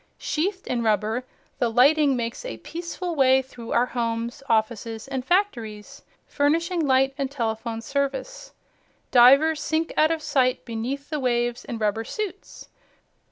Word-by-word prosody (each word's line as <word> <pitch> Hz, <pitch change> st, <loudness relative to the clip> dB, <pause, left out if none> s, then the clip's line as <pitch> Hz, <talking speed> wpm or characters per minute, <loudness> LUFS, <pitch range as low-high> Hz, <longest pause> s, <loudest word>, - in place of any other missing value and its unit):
Sheathed 370 Hz, +5 st, -2 dB
in 245 Hz, -2 st, -1 dB
rubber, 220 Hz, +2 st, 0 dB, 0.3 s
the 240 Hz, -, +2 dB
lightning 280 Hz, +4 st, +4 dB
makes 235 Hz, -, -4 dB
a -, -, -6 dB
peaceful 345 Hz, +1 st, -5 dB
way 265 Hz, -3 st, +4 dB
through 240 Hz, -3 st, -10 dB
our 240 Hz, -, +3 dB
homes, 235 Hz, 0 st, -3 dB
offices 225 Hz, 0 st, -1 dB
and 265 Hz, -2 st, -3 dB
factories, 240 Hz, -, -1 dB, 0.2 s
furnishing 330 Hz, +4 st, 0 dB
light 265 Hz, 0 st, +3 dB
and 275 Hz, -1 st, -1 dB
telephone 225 Hz, -3 st, -3 dB
service. 280 Hz, -, -3 dB, 0.6 s
Divers 275 Hz, +6 st, +6 dB
sink 320 Hz, +2 st, -1 dB
out 310 Hz, -, +4 dB
of 325 Hz, -1 st, -2 dB
sight 255 Hz, -3 st, +1 dB
beneath 255 Hz, +6 st, -4 dB
the 305 Hz, -, -1 dB
waves 240 Hz, -2 st, 0 dB
in 235 Hz, -, -5 dB
rubber 215 Hz, 0 st, 0 dB
suits. 400 Hz, -, -6 dB
260 Hz, 140 wpm, -24 LUFS, 230-310 Hz, 0.6 s, Divers